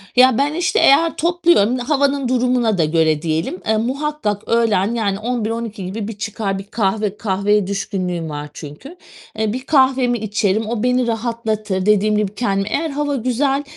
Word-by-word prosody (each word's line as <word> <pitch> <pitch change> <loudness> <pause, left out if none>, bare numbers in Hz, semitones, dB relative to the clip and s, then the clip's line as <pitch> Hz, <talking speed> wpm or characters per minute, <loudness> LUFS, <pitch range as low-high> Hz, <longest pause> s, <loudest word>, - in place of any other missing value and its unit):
Ya, 255 -1 +6
ben, 285 +2 +1
işte, 345 +2 +1
eğer 320 +4 +4
topluyorum, 335 - +2
havanın 280 +1 0
durumuna 245 -3 +1
da 165 - +3
göre 155 -1 +1
diyelim, 165 +3 -2
eee, 220 - +2
muhakkak 255 -3 -2
öğlen, 225 -2 +2
yani, 200 -4 -1
11-12 225 -3 -3
gibi 200 +3 -4
bir 220 -2 -7
çıkar 205 -2 -3
bir - - -7
kahve 205 0 -1
kahveye 205 -1 +1
düşkünlüğüm 185 -4 -3
var 150 0 -6
çünkü. 150 - -10 0.4
Eee, 220 0 0
bir 255 +1 -5
kahvemi 260 -4 +3
içerim, 215 0 -1
o 230 -1 -2
beni 250 0 +2
rahatlatır. 220 -4 -2
Dediğim 210 0 +3
gibi 210 -1 -1
kendimi 195 -3 -1
Eğer 320 +6 -1
hava 290 0 -2
güzel, 270 +3 0
220 Hz, 160 wpm, -19 LUFS, 200-255 Hz, 0.4 s, Ya